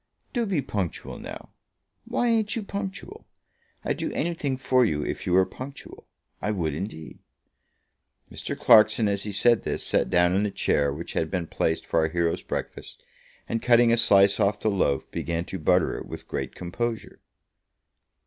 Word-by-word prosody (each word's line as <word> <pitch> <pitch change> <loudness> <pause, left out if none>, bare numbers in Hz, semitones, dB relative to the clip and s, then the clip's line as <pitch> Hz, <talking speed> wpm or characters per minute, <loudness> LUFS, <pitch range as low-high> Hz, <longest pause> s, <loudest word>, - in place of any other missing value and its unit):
"Do 235 -3 0
be 175 -8 0
punctual 100 -8 -4
now. - - -9 0.5
Why 245 - 0
ain't 220 -2 +1
you 225 - -3
punctual? 200 - -6 0.6
I'd - - -1
do - - -3
anything 155 -6 -1
for 130 -1 +3
you 75 -10 0
if - - -4
you 90 - +1
were 95 +1 +5
punctual. 135 +7 -10 0.3
I 105 - -1
would 85 -8 -1
indeed." 80 -1 -7 1.1
Mr. - - -5
Clarkson, 110 0 +6
as 100 0 -1
he 105 - -3
said 115 +4 +3
this, - - -3
sat - - +1
down 90 0 +3
in 95 - +2
the 105 - 0
chair 70 -6 +1
which 75 +4 -6
had 80 - -1
been 90 -3 -2
placed 80 0 -1
for 85 - +1
our 80 - +2
hero's 85 0 0
breakfast, - - -6 0.4
and 115 0 -2
cutting 120 -1 +5
a - - +5
slice 100 -3 +5
off 100 +1 +2
the 110 - +1
loaf, 70 -8 +1
began 85 0 -3
to 95 - -6
butter 90 +2 +2
it - - -9
with - - -8
great - - -4
composure. 115 +6 -4
100 Hz, 175 wpm, -26 LUFS, 85-130 Hz, 1.1 s, Clarkson